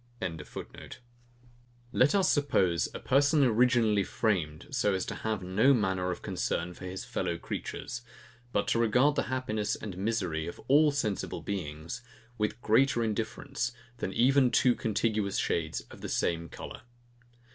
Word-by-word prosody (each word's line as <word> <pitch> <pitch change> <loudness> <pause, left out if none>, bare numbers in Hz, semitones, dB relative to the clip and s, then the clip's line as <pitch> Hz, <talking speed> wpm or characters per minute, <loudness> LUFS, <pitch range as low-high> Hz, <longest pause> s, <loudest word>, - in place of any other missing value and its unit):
] 110 -10 -6 1.5
Let 130 +8 +4
us 190 -2 +4
suppose 95 - +2
a - - -6
person 145 +3 +3
originally 115 -4 +4
framed 85 -9 -1
so 120 -7 +1
as 95 - -1
to - - -4
have 110 -3 -3
no 110 +10 +4
manner 95 -4 0
of 90 - -4
concern 85 +1 -2
for 95 - -10
his 95 +1 -5
fellow 85 -2 -2
creatures, 120 +7 -5 0.5
but 100 -1 0
to 115 - +2
regard 125 +6 +4
the - - +1
happiness 110 -5 -1
and 100 -4 -7
misery 95 -7 -1
of 85 - -7
all 150 +3 +6
sensible 115 -9 -2
beings 85 +2 -5 0.4
with 105 +2 -1
greater 120 +2 +3
indifference 120 +3 -2 0.2
than 95 - -3
even 130 +4 +4
two 125 0 +4
contiguous 110 -3 0
shades 80 -1 -1
of - - -12
the - - -5
same 85 -1 0
colour. - - -8
110 Hz, 145 wpm, -30 LUFS, 95-125 Hz, 1.5 s, all